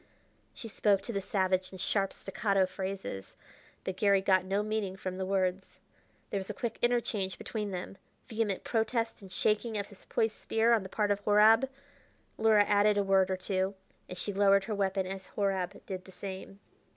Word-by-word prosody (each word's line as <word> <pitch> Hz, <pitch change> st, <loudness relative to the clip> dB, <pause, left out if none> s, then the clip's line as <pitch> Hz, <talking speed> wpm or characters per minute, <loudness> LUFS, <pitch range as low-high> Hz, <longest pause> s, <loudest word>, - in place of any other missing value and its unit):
She 235 Hz, -, -7 dB
spoke 200 Hz, -2 st, +2 dB
to 235 Hz, -, -5 dB
the 200 Hz, -, -1 dB
savage 185 Hz, -1 st, 0 dB
in 190 Hz, -, -9 dB
sharp, 195 Hz, +1 st, 0 dB
staccato 195 Hz, -1 st, 0 dB
phrases, 190 Hz, -, -6 dB, 0.5 s
but 190 Hz, -1 st, -4 dB
Garry 200 Hz, -1 st, +4 dB
got 190 Hz, -1 st, +3 dB
no 195 Hz, +2 st, 0 dB
meaning 215 Hz, -3 st, -2 dB
from 185 Hz, -1 st, -5 dB
the 190 Hz, -, -2 dB
words. 190 Hz, -1 st, -1 dB, 0.5 s
There 200 Hz, -, 0 dB
was 190 Hz, -, -7 dB
a -, -, -4 dB
quick 235 Hz, -5 st, -4 dB
interchange 235 Hz, -5 st, 0 dB
between 210 Hz, -2 st, -4 dB
them; 185 Hz, +1 st, -6 dB, 0.3 s
vehement 220 Hz, -5 st, -1 dB
protest 225 Hz, 0 st, -1 dB
and 190 Hz, -2 st, -12 dB
shaking 215 Hz, +3 st, 0 dB
of 200 Hz, -1 st, -3 dB
his 200 Hz, -, -16 dB
poised 220 Hz, -1 st, -1 dB
spear 225 Hz, +1 st, +3 dB
on 225 Hz, -, +3 dB
the 190 Hz, -, -8 dB
part 205 Hz, +1 st, 0 dB
of 200 Hz, -, +1 dB
Horab. 215 Hz, +5 st, +5 dB, 0.7 s
Luhra 220 Hz, -2 st, +6 dB
added 205 Hz, 0 st, +4 dB
a 200 Hz, -, +3 dB
word 195 Hz, -1 st, +3 dB
or 190 Hz, -, 0 dB
two, 190 Hz, +1 st, -1 dB, 0.3 s
and 180 Hz, -, -7 dB
she 205 Hz, +2 st, -3 dB
lowered 200 Hz, 0 st, +4 dB
her 215 Hz, +2 st, -3 dB
weapon 195 Hz, -1 st, 0 dB
as 190 Hz, 0 st, -6 dB
Horab 195 Hz, -3 st, -2 dB
did 185 Hz, -2 st, -6 dB
the 190 Hz, -, -13 dB
same. 195 Hz, +1 st, -8 dB
195 Hz, 190 wpm, -31 LUFS, 190-215 Hz, 0.7 s, Luhra